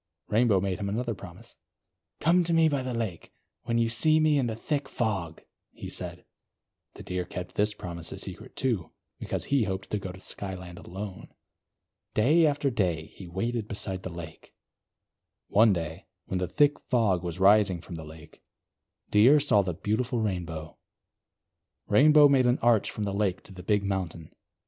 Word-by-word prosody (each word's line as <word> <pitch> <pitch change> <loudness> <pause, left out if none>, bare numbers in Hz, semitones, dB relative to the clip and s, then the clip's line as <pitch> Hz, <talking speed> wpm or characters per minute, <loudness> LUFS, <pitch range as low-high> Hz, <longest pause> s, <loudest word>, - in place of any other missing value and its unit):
Rainbow 110 -2 +3
made 95 +1 -2
him 100 -1 -2
another 115 +3 -2
promise. 100 - -12 0.6
"Come 175 +3 +4
to 170 0 +1
me 165 -1 +5
by 145 -3 0
the 130 -1 -4
lake, 110 -8 -4 0.3
when 115 -1 0
you 115 0 +3
see 155 +8 +3
me 155 -2 +3
in 125 - +1
the 110 - -3
thick 145 +4 -3
fog," 95 -10 -2 0.3
he - - -8
said. - - -5 0.7
The - - -10
Deer 90 0 -3
kept 90 0 -7
this 105 +1 +1
promise 85 -4 -5
a - - -6
secret, - - -8
too; 115 -10 -1 0.3
because - - -3
he 140 -5 +1
hoped 95 0 -4
to 105 - 0
go 95 -2 -6
to 95 - -12
Skyland 95 -2 -7
alone. 95 +1 -7 0.9
Day 155 +9 +5
after 145 -1 0
day, 85 -8 -1
he 95 - -10
waited 110 +5 -2
beside 95 -3 -5
the 95 - -5
lake. 85 -2 -10 0.9
One 110 +1 +5
day, 85 -1 -4 0.2
when 95 - -2
the 90 - -1
thick 145 +6 +3
fog 105 -8 +2
was 90 0 -5
rising 100 -2 +5
from 85 - -10
the 80 -1 -6
lake, 80 +1 -13 0.7
Deer 120 +9 +6
saw 125 -8 +3
the 90 -3 -3
beautiful 115 - -1
Rainbow. 85 -7 -4 1.1
Rainbow 150 +1 +7
made 135 -3 +4
an 125 - +3
arch 115 -3 +4
from 105 - -4
the 100 -1 -2
lake 100 -2 -1
to 100 - -14
the 90 - -9
big 105 +2 +1
mountain. 90 -5 -4
105 Hz, 175 wpm, -28 LUFS, 90-120 Hz, 1.1 s, Rainbow